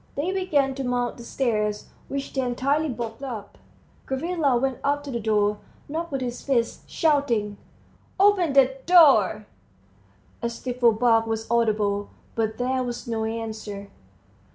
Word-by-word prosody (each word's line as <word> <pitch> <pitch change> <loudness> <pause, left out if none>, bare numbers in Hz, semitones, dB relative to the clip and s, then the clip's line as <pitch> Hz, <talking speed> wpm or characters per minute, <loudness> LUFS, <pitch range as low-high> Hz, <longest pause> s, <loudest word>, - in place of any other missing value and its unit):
They 315 +6 -1
began 300 -8 +1
to 270 0 -4
mount 245 -1 -1
the 240 - -10
stairs, 215 -4 -1 0.2
which 275 0 -4
they 265 - 0
entirely 275 +5 0
blocked 230 -1 -5
up. 240 -7 -7 0.5
Gavrila 285 -1 +1
went 265 0 -1
up 285 +1 0
to 285 - -6
the 235 - -2
door, 210 -1 +1 0.3
knocked 330 +3 -4
with 270 -1 -2
his 245 -1 -4
fist, 245 -4 -1
shouting, 240 -10 +1 0.6
"Open 385 -6 +4
the 265 -1 +4
door!" 265 - +6 1.0
A 235 - -1
stifled 240 -1 +1
bark 225 -1 +3
was 225 0 -2
audible, 210 -3 +1 0.2
but 220 -1 -1
there 255 +1 0
was 240 -1 -5
no 225 -1 -1
answer. 220 -3 -5
245 Hz, 145 wpm, -25 LUFS, 220-275 Hz, 1.0 s, door